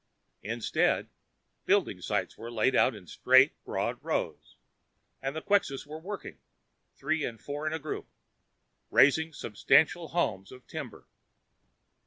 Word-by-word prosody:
Instead, 115 +1 0 0.5
building - - +2
sites - - -2
were 115 +2 -8
laid 120 +3 +2
out 130 - +4
in 100 -4 -12
straight, 130 - +5
broad - - -3
rows, - - -3 0.7
and 135 +2 -3
Quxas 170 -5 0
were 155 +2 -8
working, 180 - -7 0.6
three 155 +3 -1
and 115 -4 -4
four 145 +2 -5
in 155 - -1
a - - -1
group, 155 -1 -6 0.8
raising 160 +3 +4
substantial 150 +6 +2
homes 100 - -1
of 125 -1 -13
timber. - - -8
140 Hz, 125 wpm, -29 LUFS, 120-160 Hz, 0.8 s, straight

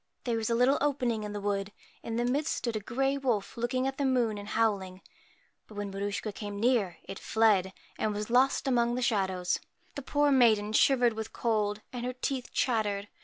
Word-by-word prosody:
There 240 -4 -1
was 225 0 -2
a 230 - +2
little 250 +4 +3
opening 250 -6 0
in 210 - -5
the 205 - -4
wood; 200 0 -2 0.3
in 225 - -5
the 240 +1 0
midst 285 +5 0
stood 235 -2 -3
a - - 0
grey 270 +6 -1
wolf 240 -7 -1
looking 245 +2 -1
up - - 0
at - - -28
the 280 - +1
moon 240 -5 +1
and 205 - -9
howling; 200 -4 0 0.7
but 215 - -14
when 205 -1 -4
Maruschka 200 +2 -3
came 205 -1 -6
near, 215 -7 +1
it 195 - -8
fled, 210 -4 +2 0.3
and 215 - 0
was 210 +2 -4
lost 265 +3 +3
among 240 -2 +2
the 250 - -1
shadows. 190 -5 0 0.3
The 280 - -5
poor 290 +2 +2
maiden 220 -5 +4
shivered 245 0 +4
with 220 -1 -6
cold, 210 -2 0
and 245 -1 -4
her 250 +1 -2
teeth 255 0 -3
chattered. 210 -5 0
225 Hz, 205 wpm, -29 LUFS, 205-250 Hz, 0.7 s, maiden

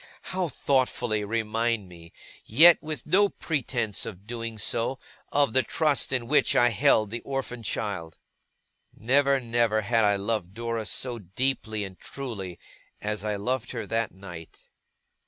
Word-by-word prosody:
How 185 -1 0
thoughtfully 125 -6 0
remind 115 0 -1
me, 85 -2 -14 0.3
yet 160 +9 +7
with 155 -1 -5
no 200 +6 +4
pretence 120 - -2
of 100 -2 -7
doing 115 -1 -5
so, 115 +4 -1 0.3
of 140 -5 +2
the 130 - +5
trust 150 -1 +1
in 125 -3 0
which 150 +5 +3
I 120 - +5
held 105 -1 +3
the 120 - -3
orphan 135 -3 -4
child! 100 -7 -3 0.8
Never, 140 +4 +3
never, 115 -3 +1
had 115 +1 +2
I 105 -1 +4
loved 100 -2 -2
Dora 115 -1 -3
so 125 -2 -2
deeply 110 +2 -1
and 95 -2 -8
truly, 105 -10 -6 0.4
as 105 0 -3
I 105 -1 -1
loved 125 +6 -2
her 115 - -4
that 115 -1 -1
night. 90 -4 -11
115 Hz, 145 wpm, -27 LUFS, 105-130 Hz, 0.8 s, yet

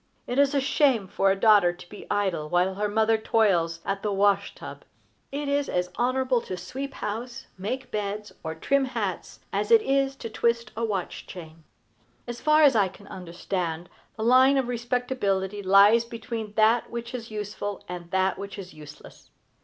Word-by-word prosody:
It 245 +3 -1
is 280 0 +3
a - - +4
shame 265 -6 +2
for 195 +1 +1
a 195 0 +1
daughter 205 -5 +5
to 175 0 -13
be 205 - -11
idle 185 -7 -1
while 180 +3 +2
her 205 +2 -2
mother 220 +1 +2
toils 175 -7 +1
at 195 0 -2
the 210 - -1
wash 200 0 +2
tub. - - -10 0.5
It 285 +1 -3
is 280 0 0
as 180 0 -1
honorable 255 0 +1
to 185 - -6
sweep 265 +10 -6
house, 235 +3 -5
make 215 +8 -5
beds, 210 0 -4
or 160 -1 -4
trim 275 - +1
hats, 260 - -4
as - - -1
it 455 -2 +6
is 275 -2 +1
to 245 - -7
twist 235 +1 0
a 230 - -3
watch 200 -5 -3
chain. 165 -3 -11 0.6
As 240 0 -7
far 305 0 +4
as 280 -4 +6
I 205 -3 +4
can 190 +2 -14
understand, 175 -1 -4 0.3
the 220 - -3
line 260 +3 +5
of 265 -2 0
respectability 235 -5 -1
lies 200 +4 +6
between 230 -2 -6
that 220 +2 +3
which 235 +1 -6
is 235 -2 -6
useful 210 -1 -5
and 175 -1 -7
that 190 +1 0
which 200 0 -7
is 190 -2 -9
useless. 150 -1 -14
210 Hz, 180 wpm, -26 LUFS, 190-245 Hz, 0.6 s, it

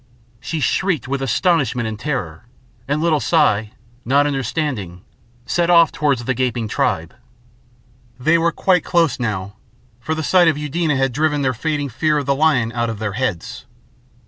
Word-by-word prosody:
She 160 - -4
shrieked 160 - 0
with 135 +1 -2
astonishment 135 - +1
and 110 -1 -5
terror, 110 - -4 0.4
and 145 +2 0
little 160 -3 +2
Si, 110 -11 +2 0.3
not 140 +4 +3
understanding, 130 - -3 0.4
set 170 +6 0
off 170 -2 +6
towards 140 -6 0
the 130 - 0
gaping 120 -3 -1
tribe. - - -1 1.1
They 160 +6 +3
were 170 +1 +2
quite 180 0 +2
close 165 -7 +1
now, 105 -3 -3 0.4
for 155 +7 -3
the 160 - -3
sight 180 +2 +4
of 160 -3 +2
Eudena 150 +1 -1
had 135 0 +1
driven 150 0 0
their 130 -1 +1
fading 145 +3 -2
fear 150 +5 0
of 145 - -2
the 140 - +2
lion 135 -6 +2
out 120 0 -1
of 115 - -4
their 105 -1 -3
heads. 110 -6 -4
140 Hz, 165 wpm, -19 LUFS, 120-155 Hz, 1.1 s, off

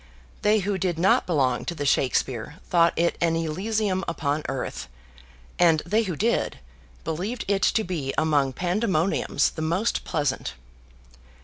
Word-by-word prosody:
They 210 0 +3
who 195 0 -1
did 175 -2 -1
not 185 +2 +3
belong 135 -7 +1
to 170 - -3
the 145 -2 -3
Shakspeare 130 -1 0
thought 170 -1 +4
it 170 +1 +1
an 165 -1 +2
Elysium 190 +4 -1
upon 150 -2 -1
earth; 130 - -4 0.7
and 165 -3 +4
they 215 +6 +2
who 190 -7 -3
did, 230 +9 0 0.5
believed 195 +10 -3
it 195 -1 +1
to 220 - +2
be 160 -8 -3
among 145 -4 +2
Pandemoniums 180 - +1
the 160 - -6
most 175 +8 0
pleasant. 135 - -2
170 Hz, 140 wpm, -25 LUFS, 150-195 Hz, 0.7 s, thought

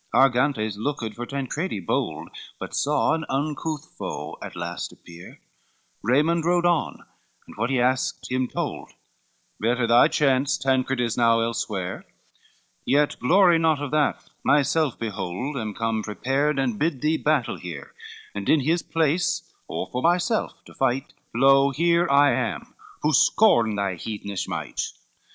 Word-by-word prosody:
LXXXIV - - -1
Argantes 125 -5 +2
looked 115 -2 -3
for 120 +2 -6
Tancredi 140 - -3
bold, 85 - -2 0.3
But - - -7
saw 150 +1 +1
an 160 - -1
uncouth 150 +2 -2
foe 75 -7 -5
at - - -8
last 85 0 -5
appear, 85 +1 -14 0.6
Raymond 150 +9 +2
rode 175 +1 +2
on, 175 -3 0 0.4
and - - -14
what 115 +3 -1
he 135 -2 +1
asked 130 +1 0
him, 130 0 0
told, - - -5 0.7
Better 120 +2 +1
by 120 +1 +6
chance, 135 -1 +2
"Tancred 130 -1 0
is 120 -2 -1
now 115 -1 +4
elsewhere, 100 -5 -3 0.8
Yet 145 +1 +1
glory 175 +4 +5
not 160 -3 +2
of 145 -2 -4
that, 150 -1 0 0.2
myself 145 0 +2
behold 110 +5 -4
Am 110 -5 -4
come 115 -1 -1
prepared, 135 +7 -1
and 125 -6 -1
bid 155 -4 0
thee 155 +1 +2
battle 150 -7 0
here, 90 -1 -8 0.4
And 100 -1 -4
in 155 - +5
his 165 +5 +1
place, 165 +2 0
or - - -4
for 125 - -2
myself 175 - 0
to - - -14
fight, 135 0 -1 0.2
Lo, 135 +1 +5
here 170 +4 +2
I 140 0 +5
am, 115 - -3 0.3
who 155 +1 +2
scorn 145 - +4
thy 100 -2 -1
heathenish 100 0 -5
might." - - -4
135 Hz, 150 wpm, -24 LUFS, 115-150 Hz, 0.8 s, by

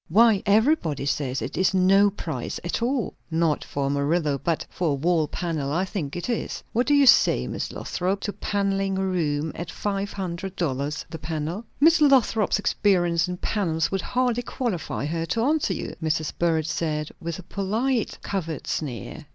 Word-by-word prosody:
Why, 215 +2 +5
everybody 205 - +2
says 140 -2 -1
it - - -5
is 190 0 +3
no 195 +2 +5
price 160 -10 -5
at 175 +6 -2
all." 245 -2 0 0.2
"Not 160 -2 +1
for 140 - -3
the 135 - 0
Murillo; 145 0 +1
but 165 0 0
for 175 -3 -2
a - - 0
wall 160 +2 +1
panel, 155 -6 -3
I 175 +5 +1
think 175 -8 -4
it 175 - -4
is. 240 -2 -3
What 245 +3 +1
do 290 - +4
you 285 -1 +6
say, 265 - +5
Miss - - -4
Lothrop, 185 +2 -2
to 205 - -3
panelling 195 -1 -1
a 190 - 0
room 160 -4 0
at 170 0 -6
five 200 +1 -2
hundred 185 0 -4
dollars 145 -2 -2
the 160 - -6
panel?" 160 +7 -4
"Miss 325 +3 +5
Lothrop's 255 -7 +4
experience 175 -5 +2
in 180 0 -4
panels 170 -6 0
would 195 -1 0
hardly 245 +1 0
qualify 230 - -3
her 165 +2 -2
to 225 +8 0
answer 285 - +1
you," - - -5
Mrs. 155 -1 -1
Burrage 165 -2 +1
said, 155 -2 -2
with 170 -2 -4
a 185 - -9
polite 220 +7 -1
covert 165 -5 -3
sneer. 145 +2 -4
180 Hz, 180 wpm, -25 LUFS, 160-205 Hz, 0.2 s, you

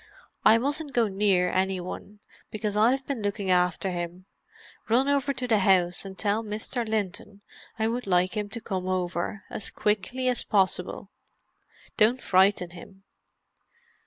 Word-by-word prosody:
I 220 - +7
mustn't 285 +4 -2
go 235 -2 +3
near 190 -2 +2
any 190 0 0
one, 200 +3 -8 0.3
because 210 -1 -3
I've 250 +5 +3
been 275 -5 -3
looking 200 -2 -1
after 180 +1 +2
him. 175 +1 -5 0.6
Run 250 +5 +3
over 280 -1 +1
to 255 -2 -4
the 220 -3 +3
house 185 -2 +2
and 190 -1 -8
tell 210 +1 0
Mr. 220 +3 -3
Linton 205 -1 -3 0.4
I 220 - 0
would 240 0 -3
like 180 +2 +2
him 210 -1 -2
to 230 +2 -7
come 190 -4 -3
over—as 185 +2 -3
quickly 215 +5 -1
as 250 -2 +1
possible. 190 -1 0 0.9
Don't 230 +4 +4
frighten 185 -1 +3
him." 190 +2 -13
205 Hz, 145 wpm, -27 LUFS, 185-225 Hz, 0.9 s, I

